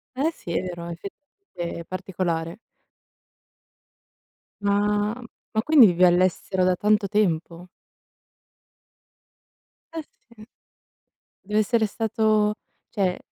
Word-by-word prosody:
Eh 280 +5 +1
sì, 175 - -9
è 170 - 0
vero, 175 -2 -6
effettivamente 195 - -8
è 170 - -8
particolare. 180 -1 -3 2.1
Ma 205 +1 +1 0.4
ma 220 - +2
quindi 300 -8 +7
vivi 180 0 +2
all'estero 185 +1 +2
da 185 0 +3
tanto 210 +2 +2
tempo? 180 -4 -1 2.3
Eh, 325 - -3 0.3
sì. 220 -2 -15 1.0
Dev'essere 215 +3 +1
stato 215 -1 +1 0.3
cioè 190 -4 0
200 Hz, 90 wpm, -24 LUFS, 180-215 Hz, 2.3 s, quindi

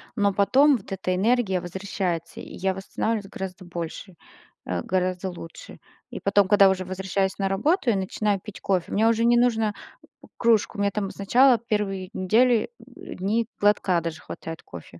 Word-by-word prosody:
но 205 -3 +2
потом 270 +8 +4
вот 195 - -15
эта 185 -1 -2
энергия 205 -2 +1
возвращается, 180 -2 -4
и - - -10
я 190 +1 -1
восстанавливаюсь 200 +2 -3
гораздо 190 -1 -7
больше, 175 +2 -7 0.5
э, - - -2
гораздо 185 0 -1
лучше. 175 - -11 0.3
И - - -6
потом, 200 -1 +3
когда 200 -1 +6
уже 185 -1 -1
возвращаюсь 190 +1 -2
на 195 -1 0
работу 280 - +1
и 225 - +3
начинаю 200 +1 -1
пить 210 +2 -11
кофе, 185 -3 0
мне 215 +2 +2
уже 230 0 +2
не 240 0 +5
нужно 225 -3 +2 0.5
п - - -16
кружку, 230 -2 +2
мне 200 0 +1
там 200 -1 -2
сначала 245 +6 +4
1 205 -4 -2
недели, 230 - +2
дни 215 +5 -3
глотка 200 -4 +2
даже 165 -1 -5
хватает 165 0 -8
кофе. 85 0 -12
195 Hz, 165 wpm, -24 LUFS, 185-220 Hz, 0.5 s, когда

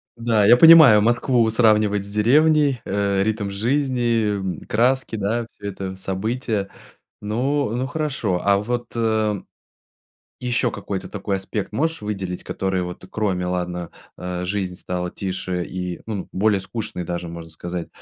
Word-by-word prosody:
Да, 115 -3 +2
я 120 +4 +7
понимаю, 155 -8 +9
Москву 120 +1 +2
сравнивать 105 -3 +3
с - - -10
деревней, 140 +4 +3
э, 100 0 0
ритм 105 -2 -1
жизни, 115 -4 0
краски, 125 +2 +1
да 110 +3 -1
всё 100 - -9
это 95 -1 -6
события. 100 +2 -2 0.5
Ну 125 +5 0
ну 130 +2 -1
хорошо, 140 - -2
а 100 -1 +4
вот 120 +4 -4 1.4
ещё 125 -1 0
какой-то 100 -1 -5
такой 100 -2 -2
аспект 95 +1 -4
можешь 160 -1 -1
выделить, 95 -4 -4
который 95 -1 -2
вот 90 +1 -7
кроме, 95 -5 -1
ладно, 90 -1 -3 0.3
э, 90 0 -4
жизнь 95 -1 -2
стала 90 0 -4
тише 95 -2 -3
и, 90 -1 -5
ну, 105 -4 -4
более 100 +1 +2
скучной 95 -2 -5
даже, 85 0 -4
можно 85 -1 -9
сказать. 85 +1 -6
105 Hz, 135 wpm, -22 LUFS, 95-120 Hz, 1.4 s, понимаю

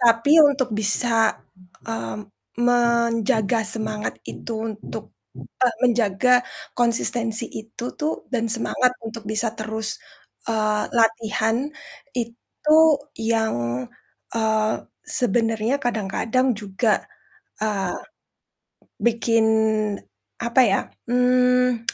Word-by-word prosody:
tapi 235 +3 +4 0.2
untuk 265 -3 0
bisa, 220 +2 +2 0.5
mmm, 115 - -5 0.2
menjaga 235 -2 +2
semangat 215 -1 -3 0.2
itu 235 - -7 0.2
untuk 215 0 -8 0.5
eee, 250 -2 +3
menjaga 235 0 +3 0.5
konsistensi 235 -1 +1
itu 225 +2 -7
tuh 305 +1 0 0.2
dan 230 -2 0
semangat 250 +2 +1
untuk 225 -2 -7
bisa 220 +1 0
terus, 220 0 -3 0.5
eee, 215 -1 +1
latihan 225 +3 +1 0.5
itu 240 +5 -1 0.4
yang, 220 - 0 0.5
eee, 220 -1 +1 0.3
sebenarnya 230 -3 +1
kadang-kadang 230 +3 0
juga, 210 +2 0 0.6
eee, 195 -4 -1 1.1
bikin 230 -1 +3 1.0
apa 240 +2 +4
ya, - - +4 0.3
mmm, 250 -1 +3
230 Hz, 85 wpm, -23 LUFS, 215-245 Hz, 1.1 s, tapi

